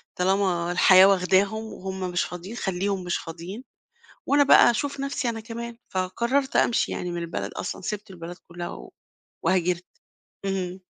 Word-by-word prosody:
طالما 180 -2 +1
الحياة 185 +1 +7
واخداهم، 195 +3 +3
وهُم 190 0 -6
مش 175 - +1
فاضيين، 180 +5 -7
خلّيهم 195 -2 -1
مش 175 -1 -1
فاضيين، 175 +8 -8 0.6
وأنا 285 +1 +4
بقى 275 - +7
أشوف 280 +4 -3
نفسي 275 -2 -1
أنا 225 -1 -4
كمان، 230 +1 -7
فقررت 235 +9 -1
أمشي 235 - +3
يعني 180 - -3
من 175 - -4
البلد 100 -12 -4
أصلًا، - - -5
سِبت 210 +2 -5
البلد 175 -1 -8
كلها، 175 0 -6
و - - -10 0.5
وهاجرت، 180 0 +1 0.6
اهم. 190 -1 -2
190 Hz, 150 wpm, -25 LUFS, 180-220 Hz, 0.6 s, الحياة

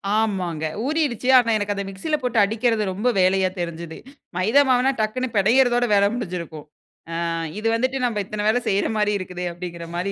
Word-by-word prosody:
ஆமாங்க, 185 -7 -1 0.2
ஊறிருச்சு. 285 -6 -1
ஆனா 230 -2 +3
எனக்கு 205 0 -2
அத 200 - -3
மிக்ஸில 250 +12 -2
போட்டு 245 -2 -2
அடிக்கிறது 225 +1 +1
ரொம்ப 210 +6 -2
வேலையா 185 0 +3
தெரிஞ்சுது. 170 -1 -5 0.4
மைதா 220 +10 +4
மாவுனால 255 +1 +3
டக்குனு 255 +4 -1
பினையறதோட 245 +4 +4
வேல 200 0 +5
முடிஞ்சிருக்கும். 170 -8 -6 0.5
அ - - -3 0.4
இது 225 - -2
வந்துட்டு, 260 +3 0
நம்ம 230 -4 -1
இத்தன 210 +1 -4
வேல 225 +3 +3
செய்ற 200 0 +1
மாரி 210 0 +1
இருக்குதே! 180 -1 -6
அப்டிங்கிற 170 -1 -7
மாரி 185 +3 -2
210 Hz, 165 wpm, -22 LUFS, 185-245 Hz, 0.5 s, வேல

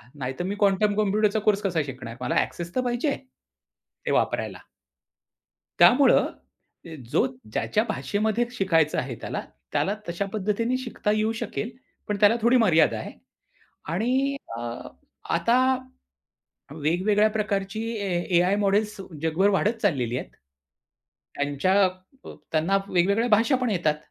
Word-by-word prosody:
नाहीतर 130 +3 -4
मी 200 +2 -2
quantum 205 +1 +3
कॉम्प्युटरचा 210 +1 +2
course 210 -1 +2
कसा 175 -6 0
शिकणार? 130 -4 -8
मला 125 - -1
ॲक्सेस 170 0 -4
तर 255 - +2
पाहिजे 245 +3 -1
आहे 280 - -1 0.9
ते - - 0
वापरायला. - - 0 1.2
त्यामुळं 270 +3 +6 0.6
ते 165 -1 -8 0.2
जो - - +3 0.3
ज्याच्या 115 - +1
भाषेमध्ये 215 +2 0
शिकायचं 170 -9 +1
आहे 125 -2 -2
त्याला, - - -4 0.3
त्याला 195 - +1 0.2
तशा 170 +4 -2
पद्धतीने 215 +4 0
शिकता 240 -4 -2
येऊ 215 +1 +1
शकेल. 220 - -3 0.4
पण 210 - -1
त्याला 210 +3 +5
थोडी 240 +3 +4
मर्यादा 165 -10 +4
आहे - - -7 0.8
आणि 260 +8 +1 0.2
अ, - - -5 0.7
आता 235 +2 +3 1.1
वेगवेगळ्या 185 +8 +2
प्रकारची 205 -1 -2
ए 200 -3 -3 0.3
एआय 180 +3 +3
मॉडेल्स 210 +1 +1 0.2
जगभर 165 +5 +2
वाढत 205 +3 +1
चाललेली 125 - 0
आहेत. - - -6 1.1
त्यांच्या 145 +8 +1 0.4
अ, - - -8 0.2
त्यांना 165 +5 +2
वेगवेगळ्या 200 +6 +2
भाषा 225 +6 +4
पण 250 - +1
येतात. 170 -6 +1
200 Hz, 130 wpm, -25 LUFS, 170-220 Hz, 1.2 s, त्यामुळं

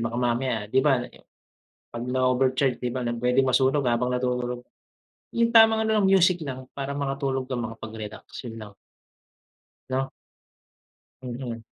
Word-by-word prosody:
baka 115 - -4
mamaya 120 -2 0
'di 130 - +5
ba, 135 -4 +2 0.9
'pag 120 0 -5
na-overcharge 130 0 +1
'di 125 - -1
ba 125 - -2
na 120 - -1
pwedeng 125 +3 +2
masunog 130 +2 +2
habang 120 0 +1
natutulog, 125 -1 -2 0.7
yung 235 0 +3
tamang 225 -1 +6
ano 220 -1 +2
lang 195 - +3
music 185 -2 +4
lang 130 -3 -6
para 140 0 -4
makatulog 135 -1 -1
ka 130 0 -5
makapag-relax 110 -2 -7 0.2
yun 115 - -8
lang. 105 -1 -13 1.2
No. 135 +1 -1 1.1
Mhm. 120 -2 -6
130 Hz, 140 wpm, -25 LUFS, 120-140 Hz, 1.2 s, tamang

